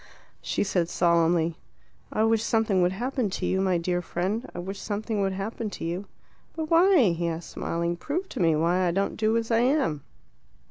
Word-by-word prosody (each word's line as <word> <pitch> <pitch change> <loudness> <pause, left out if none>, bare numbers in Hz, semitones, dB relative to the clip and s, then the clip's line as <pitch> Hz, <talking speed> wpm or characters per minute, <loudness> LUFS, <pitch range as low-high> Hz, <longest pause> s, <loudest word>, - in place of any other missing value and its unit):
She - - -1
said 180 -4 0
solemnly, 170 -1 +2 0.5
"I 215 - +1
wish 225 0 +3
something 220 -5 +2
would 175 0 +3
happen 245 +1 -1
to - - -3
you, 190 - +1
my 185 -2 +2
dear 175 +1 -1
friend; 195 +9 -3
I - - -6
wish 190 +3 -5
something 210 0 -2
would 195 -1 0
happen 210 +3 -4
to 200 - -6
you." 175 +4 -3 0.5
"But 320 -1 -4
why?" 335 - +6
he 170 0 -2
asked, 165 0 -5
smiling. 170 +1 -2
"Prove 345 - -3
to - - -6
me 165 -3 +3
why 175 +4 +2
I - - +2
don't 195 +3 0
do 220 +1 +1
as 230 0 -2
I 225 - +4
am." 250 - +1
195 Hz, 195 wpm, -26 LUFS, 175-225 Hz, 0.5 s, why